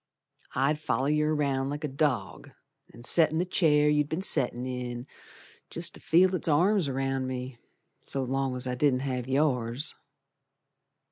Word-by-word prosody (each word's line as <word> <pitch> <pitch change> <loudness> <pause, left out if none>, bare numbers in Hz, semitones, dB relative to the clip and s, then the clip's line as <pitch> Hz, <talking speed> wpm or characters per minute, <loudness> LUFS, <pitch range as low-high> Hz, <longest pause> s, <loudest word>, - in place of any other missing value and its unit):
I'd 150 +3 +1
foller 135 -1 -1
yer 150 0 +1
around 135 -2 0
like 145 +2 -5
a - - 0
dog, 135 -7 -2 0.4
An' 120 - -14
set 160 +4 +6
in 160 - -2
the 175 - +1
chair 150 -5 +3
you'd 150 -1 +2
be'n 165 +4 -3
settin' 125 -8 +1
in, 125 -1 -5 0.6
Jest - - -4
to - - -12
feel 180 +3 +3
its 185 - -3
arms 175 +2 +2
around 135 0 -2
me, 125 -1 -6 0.4
So 135 - -3
long's 130 0 -2
I 125 - -2
didn't 130 0 +1
have 130 -2 -3
yours. 130 -2 0
135 Hz, 155 wpm, -28 LUFS, 125-150 Hz, 0.6 s, set